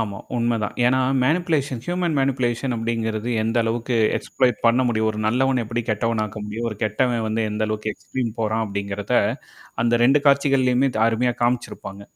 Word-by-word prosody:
ஆமா, 100 -3 -3 0.2
உண்மைதான். 115 -3 -1
ஏன்னா, 130 +1 +3 0.2
மேனிப்லேஷன், 150 -5 0
ஹியூமன் 175 -2 -1
மேனிபுலேஷன் 130 -2 0
அப்படிங்கிறது 115 0 -2
எந்த 115 +2 -1
அளவுக்கு 115 +1 -1 0.2
எக்ஸ்ப்ளை 130 -1 +1 0.2
பண்ண 120 +2 +4
முடியும். 110 -1 +1
ஒரு 105 - -6
நல்லவன் 130 +2 +2
எப்படி 115 +2 -2
கெட்டவனாக்க 110 0 -1
முடியும். 110 +3 -4
ஒரு 105 - -7
கெட்டவன் 115 +2 0
வந்து 110 +1 0
எந்த 105 +1 -2
அளவுக்கு 110 0 -2
எக்ஸ்ப்ளைன் 125 -3 -4
போறான் 110 0 0
அப்படிங்கிறத 100 0 -4 0.7
அந்த 120 0 +2
2 135 +4 +5
காட்சிகள்லயுமே 135 -2 +3
த - - -1
அருமையா 120 +2 +1
காமிச்சிருப்பாங்க. 120 -5 -2
115 Hz, 155 wpm, -22 LUFS, 110-130 Hz, 0.7 s, 2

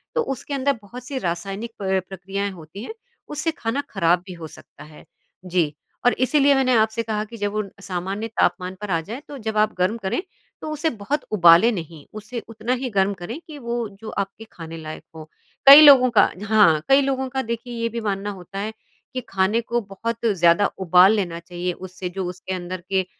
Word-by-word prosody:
तो 480 - +3
उसके 280 - -4
अंदर 275 +1 +1
बहुत 235 +5 -10
सी 275 - -4
रासायनिक 195 +5 -4
अ, 190 -1 +1
प्रक्रियाएँ 195 +2 -4
होती 175 +3 -10
हैं 350 - -7 0.4
उससे 305 +2 -1
खाना 255 -3 -2
खराब 175 -2 +2
भी 185 - -8
हो 165 -2 -8
सकता - - -15
है। 150 0 -14 0.4
जी, 175 -5 0 0.3
और 245 - +5
इसलिए 280 +2 +3
मैंने 260 -2 +2
आपसे 220 +1 +2
कहा 215 -1 -2
कि 230 +2 -11
जब 205 0 -2
वो 215 +1 -1 0.2
सामान्य 190 +3 -4
तापमान 185 -4 0
पर 210 - -5
आ 165 - +2
जाए 225 - -7
तो 285 - -8
जब 220 -2 -4
आप 215 0 +3
गर्म 185 +5 +1
करें, 195 - -2 0.4
तो 310 - -5
उसे 305 +2 0
बहुत 265 +5 -3
उबालें 180 +2 +6
नहीं 165 -7 -7
उसे 215 +3 -6
उतना 225 +2 -3
ही 255 0 -3
गर्म 200 -2 +1
करें 195 - -7
कि 310 -2 -9
वो 235 -2 -3
जो 220 - -8
आपके 200 +2 -4
खाने 165 -1 -9
लायक 155 -1 -8
हो। 155 -1 -10 0.4
कई 280 +2 +12
लोगों 275 -4 +8
का 230 - +4
हाँ, 205 -7 +4
कई 270 +1 +6
लोगों 265 -1 -1
का 265 +1 -2
देखिए 235 0 -5
ये 230 - 0
भी 230 +1 -4
मानना 200 -1 -2
होता 195 0 -8
है 215 +2 -3 0.4
कि 255 - -3
खाने 195 +4 +1
को 240 +1 -1
बहुत 225 +3 -5
ज़्यादा 175 -2 +4
उबाल 185 +2 +6
लेना 175 -5 -2
चाहिए 175 +1 -4
उससे 185 0 -7
जो 190 +1 -4
उसके 185 +1 -6
अंदर 180 0 -5
के 190 -1 +1
205 Hz, 205 wpm, -22 LUFS, 180-235 Hz, 0.4 s, कई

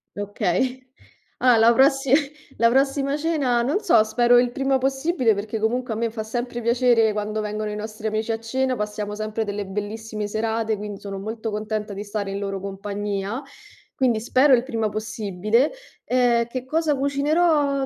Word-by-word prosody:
Okay. 205 +5 -1 0.6
Allora 250 -2 +5
la - - +5
prossi 270 0 +3 0.5
la 230 +1 +4
prossima 275 +2 +1
cena, 295 -6 +1
non 280 +11 0
so, 225 - +4
spero 240 +2 +4
il 245 -1 +1
prima 270 +1 +1
possibile 270 - +1
perché 210 +2 -4
comunque 240 +2 -1
a - - -4
me 230 +1 -1
fa 220 -1 -5
sempre 240 +2 -4
piacere 235 -2 +3
quando 210 +1 -2
vengono 210 0 -3
i 210 - -4
nostri 215 +1 -5
amici 220 +1 -1
a 225 - -2
cena, 260 +3 -1
passiamo 210 -1 -4
sempre 215 +1 -3
delle 205 -1 -4
bellissime 210 +1 -4
serate, 220 +1 -1
quindi 205 -1 -6
sono 195 -1 -6
molto 220 +2 -4
contenta 215 0 -3
di 200 +1 -5
stare 205 -1 -4
in 195 - -3
loro 195 -1 -3
compagnia, 200 +2 -4 0.5
quindi 245 -4 +1
spero 260 +4 +4
il 240 - 0
prima 225 -5 -1
possibile. 215 +3 0 0.3
Eh, 245 -2 +2
che 255 +1 -5
cosa 310 +1 +1
cucinerò? 285 0 +2
225 Hz, 170 wpm, -23 LUFS, 210-255 Hz, 0.6 s, Allora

